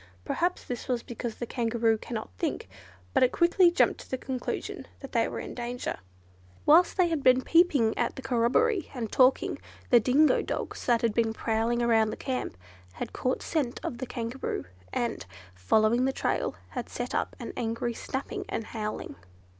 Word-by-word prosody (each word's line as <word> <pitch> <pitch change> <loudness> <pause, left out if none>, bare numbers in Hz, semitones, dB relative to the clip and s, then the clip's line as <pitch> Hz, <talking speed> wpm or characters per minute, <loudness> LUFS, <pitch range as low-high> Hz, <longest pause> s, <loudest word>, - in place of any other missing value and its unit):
Perhaps 355 +1 0
this 245 -2 -5
was 245 -2 -1
because 235 -1 -5
the 240 - -4
Kangaroo 230 -1 +1
cannot 220 - -6
think, - - -2 0.5
but - - +3
it 255 - +5
quickly 345 +1 +5
jumped 345 - +2
to - - -12
the 260 - -1
conclusion 255 -1 -4
that 275 - -9
they 230 -2 +2
were - - -5
in - - -6
danger. 245 - -4 0.7
Whilst 340 +6 +6
they 360 -2 +4
had 320 -3 -1
been 255 0 +5
peeping 295 -10 +4
at 240 - 0
the 265 - -8
corroborees, 295 - +2
and 230 -4 -4
talking, 260 0 +3 0.3
the 240 - +8
dingo 265 +7 +4
dogs - - -4
that 240 -2 +3
had 230 -2 +2
been 225 -1 +1
prowling 225 +2 0
around 225 -2 +4
the - - -5
camp, 255 - -3 0.4
had - - -6
caught 255 +1 -1
scent 280 -7 -1
of 240 - -4
the 260 - -4
Kangaroo; 235 - -4 0.3
and, 235 -2 -2 0.3
following 215 - +3
the 265 - +2
trail, - - -1
had - - -5
set - - -4
up - - -1
an - - -6
angry 230 +1 -2
snapping 285 - -4
and - - -2
howling. 215 - -5
240 Hz, 180 wpm, -28 LUFS, 230-270 Hz, 0.7 s, the